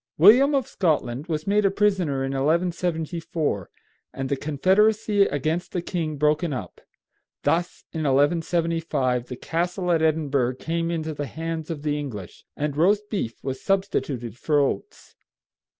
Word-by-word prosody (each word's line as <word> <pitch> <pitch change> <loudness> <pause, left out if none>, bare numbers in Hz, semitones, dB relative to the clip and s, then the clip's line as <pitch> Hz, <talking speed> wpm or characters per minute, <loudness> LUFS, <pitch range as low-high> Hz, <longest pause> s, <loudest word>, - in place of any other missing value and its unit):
William 250 - +7
of 270 -3 +1
Scotland 150 - 0
was 155 -2 -2
made 205 +1 +2
a 195 - +4
prisoner 190 -9 +1
in 135 - -2
1174, 160 - -1 0.4
and 135 0 -4
the 140 - +1
confederacy 200 +8 +3
against 155 +5 -2
the 180 - -1
king 160 -5 -3
broken 150 +3 +2
up. 105 -9 -6 0.6
Thus, 175 +1 0
in 160 - -3
1175, 150 -3 +1
the 125 - -6
castle 175 +6 -1
at 165 -2 +3
Edinburgh 145 -5 +1
came 165 +4 -2
into 160 -2 -2
the 145 -1 -4
hands 160 0 -5
of 155 -3 -5
the 150 -1 0
English, 110 -11 -7
and 145 -1 -2
roast 205 +6 +2
beef 155 - -3
was 135 -1 -4
substituted 140 - -1
for 150 -2 +2
oats. 135 -8 -2
160 Hz, 145 wpm, -24 LUFS, 140-175 Hz, 0.6 s, William